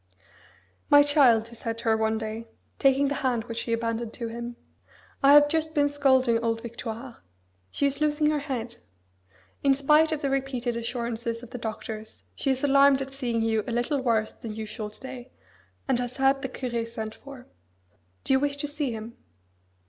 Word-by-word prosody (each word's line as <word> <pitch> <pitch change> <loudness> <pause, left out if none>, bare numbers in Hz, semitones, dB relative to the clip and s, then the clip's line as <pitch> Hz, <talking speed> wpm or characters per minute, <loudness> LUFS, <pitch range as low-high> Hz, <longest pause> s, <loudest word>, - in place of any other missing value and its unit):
"My 290 0 +8
child," 255 -7 +4
he 235 - -13
said 230 0 -4
to 230 - -8
her 225 -1 +3
one 220 0 +1
day, 220 +1 -5 0.3
taking 275 +1 +4
the 285 - 0
hand 245 -4 0
which 230 -1 -5
she 230 - -4
abandoned 230 0 -2
to 235 -2 -5
him, 235 +1 -6 0.7
"I 275 +1 +7
have 290 0 +8
just 315 +1 -1
been 290 -1 +3
scolding 260 -5 +3
old 230 -1 -1
Victoire. 235 +1 -7 0.5
She 280 - 0
is 280 +1 -1
losing 300 0 +2
her 300 - 0
head. 255 -5 -4 0.9
In 275 -1 +5
spite 300 +3 +4
of 305 -2 -2
the 275 - 0
repeated 265 -3 -1
assurances 235 0 -3
of 245 - -11
the 250 - -6
doctors, 220 -1 -6
she 275 - -2
is 265 0 0
alarmed 275 -1 +5
at 270 0 -6
seeing 240 -4 -1
you 220 -1 +1
a - - -3
little 245 +4 0
worse 225 -4 +1
than 220 -2 -8
usual 215 0 -5
to 210 - -15
day, 260 -1 -9 0.6
and 260 -3 +2
has 245 0 -4
had 270 0 +3
the 265 - -3
Curé 240 -3 -3
sent 220 -2 -6
for. 275 -1 -12 0.8
Do - - +1
you 265 - +5
wish 285 0 -1
to 290 - -3
see 290 -3 -2
him?" 225 +1 -7
245 Hz, 190 wpm, -26 LUFS, 230-275 Hz, 0.9 s, My